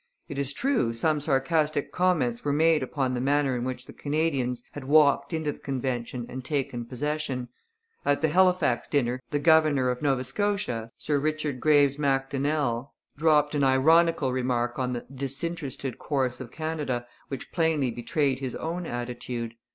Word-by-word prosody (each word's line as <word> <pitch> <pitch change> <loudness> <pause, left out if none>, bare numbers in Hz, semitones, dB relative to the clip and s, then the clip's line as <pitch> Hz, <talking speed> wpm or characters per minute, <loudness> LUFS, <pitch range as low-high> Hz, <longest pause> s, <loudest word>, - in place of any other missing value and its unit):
It 140 - -5
is 140 -1 -1
true, 235 - 0
some 150 +6 +1
sarcastic 150 +1 +1
comments 165 -11 +1
were 145 - 0
made 160 +1 +4
upon 130 0 -1
the 125 - -1
manner 140 0 +2
in 120 - -2
which 130 0 -4
the - - -11
Canadians 140 -5 -1
had 145 -2 -8
walked 145 +2 +4
into 160 -2 -1
the - - -12
convention 125 -2 -3
and 130 0 -7
taken 135 -4 -2
possession. 130 -1 -3 0.5
At 145 - +1
the 160 - +3
Halifax 180 -7 +3
dinner 130 -3 0
the 145 - 0
governor 150 -4 +4
of 125 - -5
Nova 135 -3 +1
Scotia, 165 - -2
Sir 145 -2 0
Richard 155 -2 -1
Graves 145 -1 +4
Macdonnell, 135 -2 0 0.2
dropped 150 -1 +3
an 145 -1 +1
ironical 145 +2 +4
remark 125 -1 -1
on 125 -1 -1
the 120 - -5
'disinterested' 140 -1 -4
course 130 -3 -1
of 125 - -7
Canada, 150 -5 -3 0.2
which 135 -3 -6
plainly 160 -7 +1
betrayed 130 +3 0
his 130 -3 -4
own 170 +2 -4
attitude. 120 -1 -4
140 Hz, 160 wpm, -27 LUFS, 125-155 Hz, 0.5 s, made